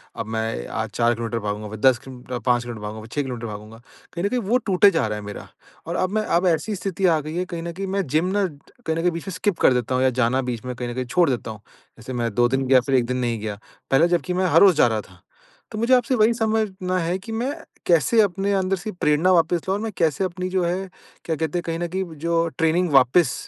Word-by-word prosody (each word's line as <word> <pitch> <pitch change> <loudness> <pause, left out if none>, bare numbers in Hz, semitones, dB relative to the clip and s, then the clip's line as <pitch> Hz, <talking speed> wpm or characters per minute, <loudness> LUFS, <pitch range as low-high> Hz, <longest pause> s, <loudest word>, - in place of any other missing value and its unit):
अब - - -4
मैं 110 - -3
आज - - -2
4 120 0 +3
किलोमीटर 115 0 -3
भागूँगा 105 0 -4
फ़िर 110 0 -8
10 130 0 +5
किल 130 - -9 0.3
5 120 -1 +2
किलोमीटर 120 -3 -7
भागूँगा 105 +1 -6
फ़िर 110 - -12
6 145 - +1
किलोमीटर 120 -3 -5
भागूँगा। 105 +1 -9 0.4
कहीं 170 +2 -4
न 200 - +1
कहीं 250 - 0
वो 230 +4 +2
टूटे 195 +2 +6
जा 165 -9 +1
रहा 105 0 -3
है 105 - -9
मेरा 105 - -8 0.4
और 170 - -3
अब 185 0 0
मैं 215 - +1
अब 185 - +1
ऐसी 175 +5 0
स्थिति 195 0 -2
आ 160 -2 +3
गई 155 +2 -6
है 180 +1 -1
कहीं 170 -2 -6
न 170 - -4
कहीं 195 +2 -5
मैं 195 0 -1
जिम 155 +6 +1
ना 200 - +2 0.4
कहीं 160 - 0
न 165 - 0
कहीं 180 - +2
बीच 170 +3 -7
में 195 - -3
स्किप 195 0 -1
कर 130 - +5
देता 125 +1 -1
हूँ 130 - +2
या 130 - +4
जाना 125 +3 +2
बीच 120 +1 -6
में 125 - -4
कहीं 120 0 -4
न 120 - -4
कहीं 130 - -2
छोड़ 155 +5 +2
देता 115 -3 -2
हूँ। 110 - -11 0.4
जैसे 115 +3 -7
मैं 120 -3 -2
2 120 0 +4
दिन 135 +1 0
गया 130 -1 +6
फ़िर 135 +1 +1
1 120 - +1
दिन 125 +1 -2
नहीं 120 -2 -1
गया। 105 -1 -4 0.4
पहले 150 +6 +5
जबकि 175 +1 0
मैं 185 +1 +1
हर - - +5
रोज़ 195 -3 +7
जा 120 - +6
रहा 110 -2 -1
था। - - -19 0.5
तो 215 - -6
मुझे 235 +3 +2
आपसे 250 +1 +1
वही 220 +1 +4
समझना 215 -5 -1
है 175 +2 -1
कि, 225 +4 -9
मैं 245 +5 -2 0.3
कैसे 175 +7 +4
अपने 200 0 0
अंदर 190 0 +1
से 195 +4 -5
प्रेरणा 175 0 +2
वापस 170 0 +2
लाऊँ 195 - +1
और - - -5
मैं 225 - -3
कैसे 165 +2 +1
अपनी 185 0 -4
जो 185 -1 0
है 185 +2 -2 0.4
क्या 160 - -1
कहते 160 +2 -2
हैं - - -6
कहीं 165 0 -2
न 175 - -2
कहीं 190 - 0 0.2
जो 170 0 +2
ट्रेनिंग 165 +2 +2
वापस 135 +2 +5
165 Hz, 275 wpm, -23 LUFS, 120-185 Hz, 0.5 s, रोज़